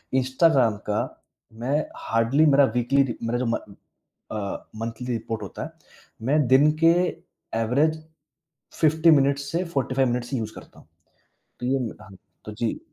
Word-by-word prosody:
Instagram 130 -2 +3
का 105 - +1 0.6
मैं 140 +5 +1 0.2
hardly 115 +7 +2
मेरा 140 -1 +6
वीकली 130 +3 +3
रि 120 -4 -4
मेरा 120 +1 -1
जो 125 - -1
म 115 - +1 0.8
अ, 105 -2 -5
मंथली 115 +2 -5
रिपोर्ट 115 -1 -4
होता 95 - -6
है, - - -6 0.6
मैं 145 -1 +3
दिन 135 +4 +5
के 165 - +7 0.7
एवरेज 150 +8 +1 0.8
50 160 +1 +5
मिनट्स 140 0 +2
से 170 +3 0
45 130 -1 +1
मिनट्स 120 +1 -3
ही 130 - 0
यूज़ 110 -1 -5
करता - - -13
हूँ। - - -22 0.7
तो 125 - -4
यह, 130 -3 0 0.2
ह - - -13 0.3
तो 105 - -6
जी। 115 - -2
130 Hz, 155 wpm, -24 LUFS, 115-140 Hz, 0.8 s, के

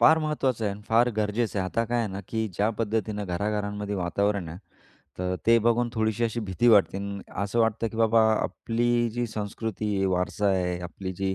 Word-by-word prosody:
फार 160 +1 +7
महत्त्वाचं 140 -7 -1
आहे 100 - 0
अन 100 - -12
फार 115 +2 +4
गरजेचं 105 0 0
आहे. 95 - 0
आता 115 +4 0
काय 120 +1 -1
आहे 115 - 0
ना, 95 - -4
की 110 -1 -1
ज्या 105 +5 +2
पद्धतीनं 110 -2 -1
घराघरांमध्ये 105 +2 -2
वातावरण 100 0 0
आहे, 85 - -8 0.6
तर 90 0 -1
ते 115 0 +6
बघून 120 +1 +2
थोडीशी 110 +1 0
अशी 115 +1 -1
भीती 105 +3 +1
वाटते 105 -4 +5
अ, - - -5
आणि 100 0 -5 0.2
असं 100 +4 -1
वाटतं, 115 0 +1
की 110 - -9
बाबा 115 0 +4
आपली 120 +2 0
जी 120 +1 -2
संस्कृती 105 -1 -3
आहे, 95 - +1
वारसा 95 +2 0
आहे, 90 -2 0
आपली 95 +2 -6
जी 95 +1 -2
105 Hz, 200 wpm, -26 LUFS, 100-115 Hz, 0.6 s, फार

